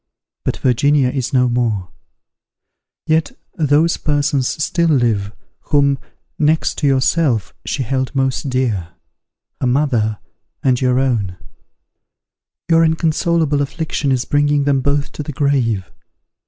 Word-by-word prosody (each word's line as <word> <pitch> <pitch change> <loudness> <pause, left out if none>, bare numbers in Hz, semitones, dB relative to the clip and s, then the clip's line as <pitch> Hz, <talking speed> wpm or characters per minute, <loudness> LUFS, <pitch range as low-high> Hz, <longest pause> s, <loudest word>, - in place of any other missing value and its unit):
But - - -2
Virginia 135 +2 +2
is 130 -1 -3
no 125 -1 +3
more; 115 -7 -1 1.1
yet 160 0 +1 0.2
those 155 +2 +2
persons 145 -3 0
still 170 +2 0
live, 115 -8 +1 0.3
whom, 140 -2 +2 0.4
next 155 +1 +1
to 145 - +1
yourself, 130 - +1
she 135 - -1
held 130 +2 -2
most 135 +1 0
dear; 110 -10 -1 0.7
her 130 - 0
mother, 125 -5 +1 0.5
and 130 -2 +2
your 125 -1 +2
own: 115 -9 0 1.3
your 165 0 +4
inconsolable 160 -2 +1
affliction 145 0 -2
is 130 -2 0
bringing 145 0 +2
them 140 -1 +2
both 140 +1 0
to - - -6
the 150 0 -6
grave. 125 -9 0
135 Hz, 120 wpm, -18 LUFS, 125-150 Hz, 1.3 s, your